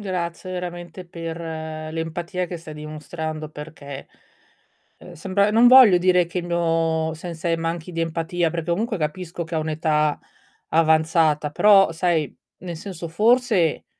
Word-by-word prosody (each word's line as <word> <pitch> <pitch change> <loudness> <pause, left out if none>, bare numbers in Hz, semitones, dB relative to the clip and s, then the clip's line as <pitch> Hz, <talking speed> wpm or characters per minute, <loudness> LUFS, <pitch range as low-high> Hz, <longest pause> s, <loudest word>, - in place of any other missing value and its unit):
Grazie 185 -2 -4
veramente 175 0 -6
per 165 -1 -6
l'empatia 165 +3 -4
che 175 - -6
stai 160 -2 -10
dimostrando 155 +1 -6
perché, 150 -2 -9 0.9
ehm, 180 - -13
sembra 195 +5 +1
non 230 +3 +5
voglio 250 -6 +8
dire 180 -1 +3
che 175 - -4
il 175 - -4
mio 165 -2 0
sensei 165 0 -3
manchi 165 +1 -4
di 165 - -3
empatia, 165 +1 -1
perché 170 0 -4
comunque 215 +4 -1
capisco 170 +2 -4
che 165 +1 -7
ha - - +2
un'età 155 -1 0 0.5
avanzata, 160 -1 +2
però 195 +3 +5
sai, 165 -3 0 0.2
nel 175 -2 -7
senso 170 -1 -7
forse 210 - +2
165 Hz, 135 wpm, -22 LUFS, 160-180 Hz, 0.9 s, voglio